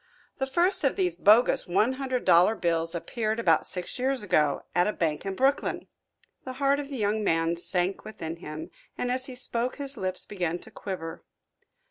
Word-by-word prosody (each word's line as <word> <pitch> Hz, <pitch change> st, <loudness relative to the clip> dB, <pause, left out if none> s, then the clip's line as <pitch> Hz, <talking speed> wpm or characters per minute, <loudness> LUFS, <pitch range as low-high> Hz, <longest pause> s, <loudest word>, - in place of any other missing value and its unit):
The 265 Hz, -, 0 dB
first 345 Hz, +7 st, +2 dB
of 275 Hz, -, +2 dB
these 180 Hz, -3 st, 0 dB
bogus 215 Hz, +7 st, +5 dB
one 215 Hz, +8 st, +2 dB
hundred 260 Hz, -2 st, -2 dB
dollar 180 Hz, +6 st, +5 dB
bills 165 Hz, -3 st, -1 dB
appeared 220 Hz, +5 st, -2 dB
about 165 Hz, -8 st, +3 dB
six 180 Hz, +6 st, -4 dB
years 260 Hz, -1 st, 0 dB
ago, 150 Hz, -7 st, +2 dB
at 175 Hz, +2 st, +3 dB
a 210 Hz, -, 0 dB
bank 160 Hz, +2 st, -1 dB
in 195 Hz, -, -2 dB
Brooklyn." 270 Hz, +6 st, +1 dB, 0.6 s
The 260 Hz, -, -6 dB
heart 280 Hz, +1 st, +2 dB
of 285 Hz, -1 st, -5 dB
the 275 Hz, -, -5 dB
young 215 Hz, 0 st, 0 dB
man 165 Hz, -2 st, +1 dB
sank 180 Hz, +2 st, -1 dB
within 170 Hz, -7 st, -6 dB
him, 160 Hz, +1 st, -8 dB, 0.3 s
and 245 Hz, -, -1 dB
as 255 Hz, +1 st, -2 dB
he 260 Hz, -, -8 dB
spoke 245 Hz, 0 st, -1 dB
his 280 Hz, -2 st, -6 dB
lips 185 Hz, -2 st, -3 dB
began 175 Hz, -4 st, -2 dB
to -, -, -14 dB
quiver. 165 Hz, -5 st, -6 dB
205 Hz, 185 wpm, -27 LUFS, 170-255 Hz, 0.6 s, bogus